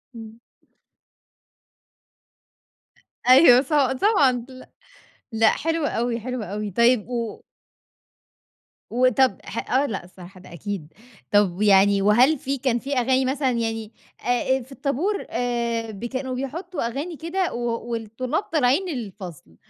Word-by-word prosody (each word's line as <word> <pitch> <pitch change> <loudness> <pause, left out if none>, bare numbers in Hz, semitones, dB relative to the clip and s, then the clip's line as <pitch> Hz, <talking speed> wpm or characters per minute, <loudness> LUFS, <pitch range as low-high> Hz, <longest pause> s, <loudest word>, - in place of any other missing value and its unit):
إمم. 225 0 -10 2.9
أيوه 255 -2 +8
ص 270 - -11 0.3
طبعًا 270 - +3
لا 255 0 -13 0.6
لأ 225 0 +4
حلو 325 0 -1
أوي، 235 -2 -1
حلو 250 0 -4
أوي، 210 0 -4
طيب 235 +2 +3
و 235 -3 -4 1.5
وطَب 255 -2 +3
ح 230 - -6
آه 275 +2 +3
لأ 195 -7 -5
صراحة 185 +1 -12
ده 180 - -14
أكيد، 175 -3 -6 0.4
طَب 205 -2 +2
يعني 200 -1 +5
وهل 245 +9 +4
في 275 +2 -3
كان 245 -2 0
في 280 +3 -4
أغاني 260 +2 +2
مثلًا 265 +1 0
يعني 225 -2 -3 0.3
آآ 245 +2 +1
آآ - - -6
في 255 +3 -15
الطابورآآ 245 - -2
ب 210 +2 -7
كانو 260 +1 -4
بيحطّوا 305 +2 -4
أغاني 295 +8 -5
كده 345 +3 -2
و 240 0 -3
والطلاب 235 - -3
طالعين 310 +2 +1
الفصل، 185 - -8
240 Hz, 125 wpm, -23 LUFS, 220-270 Hz, 2.9 s, أيوه